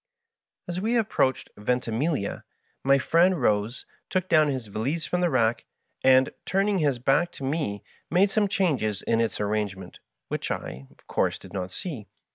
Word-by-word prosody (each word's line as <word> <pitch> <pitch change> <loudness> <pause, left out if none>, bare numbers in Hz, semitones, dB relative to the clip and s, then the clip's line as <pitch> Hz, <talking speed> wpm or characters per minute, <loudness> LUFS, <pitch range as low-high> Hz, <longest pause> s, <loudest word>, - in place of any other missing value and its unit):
As 175 +1 -3
we 225 +4 +1
approached 200 - +1
Ventimiglia 125 +3 -1 0.4
my 135 +1 +5
friend 170 +5 +3
rose, 105 0 0 0.2
took 185 -1 0
down 155 -4 +5
his 130 -4 -2
valise 115 +11 -2
from 180 - -1
the 175 - +3
rack, 120 -4 +1 0.4
and, 130 0 +5
turning 195 +1 +1
his. 145 -5 +2
back 135 +8 +2
to - - -9
me, 135 -8 -2 0.3
made 195 +3 +3
some 210 -2 +2
changes 140 - 0
in 115 0 +2
its 115 -4 -1
arrangement, 100 -3 -3 0.3
which - - -3
I, 65 +2 -5
of - - -25
course, - - 0
did - - -14
not 95 -2 -4
see. 135 - -6
130 Hz, 160 wpm, -26 LUFS, 110-175 Hz, 0.4 s, my